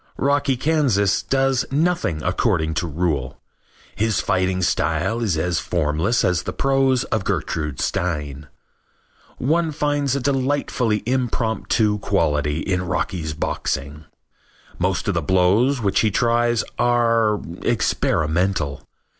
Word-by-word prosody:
Rocky 140 -1 +1
Kansas 125 - +2
does 135 -1 +1
nothing 150 - 0
according 90 -4 0
to 85 +2 -2
rule. 75 -5 -2 0.6
His 110 0 +1
fighting 95 0 0
style 85 +8 0
is 100 -8 0
as 85 +1 0
formless 85 +6 0
as 90 -1 +1
the - - -5
prose 135 -2 +2
of 110 -3 0
Gertrude 75 -7 -2
Stein. 75 -4 -2 0.9
One 160 +5 +1
finds 145 -2 0
a - - 0
delightfully 130 -4 0
impromptu 110 -3 0
quality 75 -3 0
in 95 +3 -1
Rocky's 80 -4 -2
boxing. 75 -1 -3 0.7
Most - - -1
of - - +1
the - - 0
blows 100 +9 +2
which 100 -2 +1
he 110 - +3
tries 120 +2 +1 0.2
are 115 -3 +2 0.2
experimental. 80 -2 0
105 Hz, 115 wpm, -21 LUFS, 80-130 Hz, 0.9 s, he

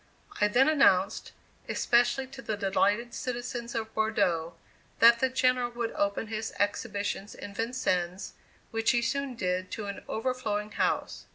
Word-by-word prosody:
I 210 - +6
then 245 +6 +4
announced, 200 -11 +3 0.4
especially 245 +2 +2
to 270 +1 -11
the 215 -5 -3
delighted 205 +4 +1
citizens 240 -1 -4
of 225 -1 -3
Bordeaux, 185 -7 0 0.4
that 235 0 +7
the 260 - +2
General 255 -1 +2
would 235 -1 -2
open 200 +2 -1
his 220 0 -4
exhibitions 205 0 -2
in 200 - -8
Vincennes, 185 -5 -1 0.4
which 225 0 +1
he 240 -2 +3
soon 275 +1 -1
did 185 -3 -1
to 215 - -4
an 200 0 -6
overflowing 220 -3 -2
house. - - -1
225 Hz, 145 wpm, -29 LUFS, 200-245 Hz, 0.4 s, that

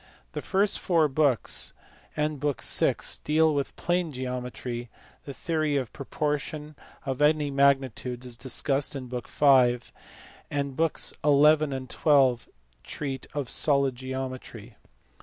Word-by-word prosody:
The - - -5
first 200 +1 +1
four 165 -4 +2
books 140 -3 +1 0.4
and 150 -1 -1
book 145 -1 -2
vi. - - +3 0.3
deal 155 +1 +3
with 140 -1 -2
plane 175 -1 -1
geometry; 125 -2 -5 0.4
the 140 - -6
theory 155 -4 0
of 130 -5 -3
proportion 150 +1 -3 0.3
(of 135 0 -3
any 150 -1 +3
magnitudes) 135 -3 +1
is 125 -1 -5
discussed 135 +4 0
in 135 -2 -5
book 125 -1 -6
v.; 130 -4 +5 0.7
and 140 -2 -2
books 165 +1 +1
xi. - - -21
and 145 -2 +3
XH. 135 -6 +3 0.4
treat 135 - -5
of 145 -3 -2
solid 140 0 +2
geometry. 130 -3 -6
140 Hz, 125 wpm, -27 LUFS, 130-150 Hz, 0.7 s, v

